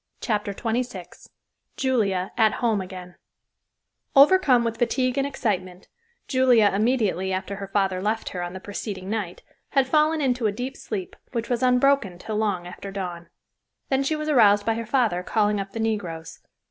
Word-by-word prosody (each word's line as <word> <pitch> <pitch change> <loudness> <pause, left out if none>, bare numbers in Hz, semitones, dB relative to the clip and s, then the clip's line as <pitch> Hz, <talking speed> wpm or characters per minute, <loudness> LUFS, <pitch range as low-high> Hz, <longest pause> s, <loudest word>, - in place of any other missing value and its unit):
CHAPTER 210 -3 -1
XXVI 225 -4 -4 0.5
JULIA 200 -8 0
AT 220 -2 +3
HOME 225 -4 0
AGAIN 185 -1 -9 1.0
Overcome 275 -4 +6
with 230 -1 -3
fatigue 255 +1 +1
and 275 - +1
excitement, 190 -9 -3 0.4
Julia 250 -6 +4
immediately 210 -4 +1
after 190 +1 -3
her 200 -1 -6
father 195 -2 0
left 220 +3 -1
her 180 - -5
on 175 0 -5
the 190 - -6
preceding 200 -1 -6
night, 205 -6 -4 0.3
had 275 -2 +4
fallen 305 +3 +2
into 250 -5 +1
a - - +1
deep 250 +6 -5
sleep, 195 -5 -6 0.2
which 235 0 -3
was 240 - 0
unbroken 250 -6 +3
till 210 +4 -4
long 200 -5 -1
after 180 +2 -8
dawn. 180 -3 -6 0.6
Then 265 0 +2
she 275 +3 0
was 305 0 -4
aroused 210 -8 +5
by 225 - +2
her 230 0 -5
father 230 -8 +1
calling 210 +1 +1
up 195 0 -5
the 225 - -6
negroes. 190 -8 -3
215 Hz, 165 wpm, -24 LUFS, 190-250 Hz, 1.0 s, Overcome